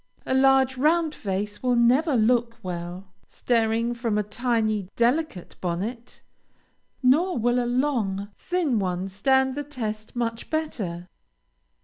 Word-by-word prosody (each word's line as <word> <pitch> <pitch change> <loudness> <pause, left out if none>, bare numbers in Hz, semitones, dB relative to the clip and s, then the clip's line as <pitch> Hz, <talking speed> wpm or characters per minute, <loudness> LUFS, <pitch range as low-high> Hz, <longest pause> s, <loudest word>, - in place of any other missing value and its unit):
A - - -1
large, 265 0 +4
round 315 +2 +2
face 205 -1 -4
will 250 -1 +2
never 255 +6 +3
look 235 +1 +2
well, 180 +1 -6
staring 230 0 0
from 235 -3 -1
a 210 - +1
tiny, 215 -3 -1
delicate 240 - 0
bonnet; 210 +8 -4 0.8
nor 330 +9 +3
will 245 +2 +2
a - - -2
long, 230 -7 0
thin 335 - 0
one 185 -1 -2
stand 265 +7 +2
the 290 +2 -4
test 220 -7 -5
much 230 -1 -3
better. 205 - -3
235 Hz, 125 wpm, -25 LUFS, 205-265 Hz, 0.8 s, large